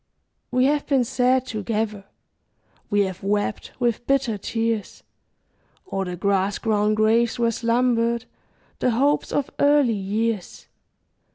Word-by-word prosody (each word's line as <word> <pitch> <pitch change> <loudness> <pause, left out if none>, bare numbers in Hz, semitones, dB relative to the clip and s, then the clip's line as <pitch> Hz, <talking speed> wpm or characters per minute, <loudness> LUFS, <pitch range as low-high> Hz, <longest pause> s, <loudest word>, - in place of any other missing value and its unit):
We 255 +1 +2
have 290 +1 +1
been 270 -3 +3
sad 255 +2 +1
together; 215 -2 -3 0.8
We 205 0 +2
have 190 -2 -2
wept 205 +1 -2
with 240 -1 -1
bitter 270 -5 +1
tears 225 0 -2 0.9
O'er 195 0 -1
the 180 -1 -4
grass 195 +1 0
grown 215 -1 +1
graves 225 +3 +2
where 235 -1 +2
slumbered 235 0 +1 0.5
The - - +2
hopes 275 +5 +1
of 285 - -1
early 285 -4 +4
years. 210 0 -2
230 Hz, 120 wpm, -23 LUFS, 205-250 Hz, 0.9 s, early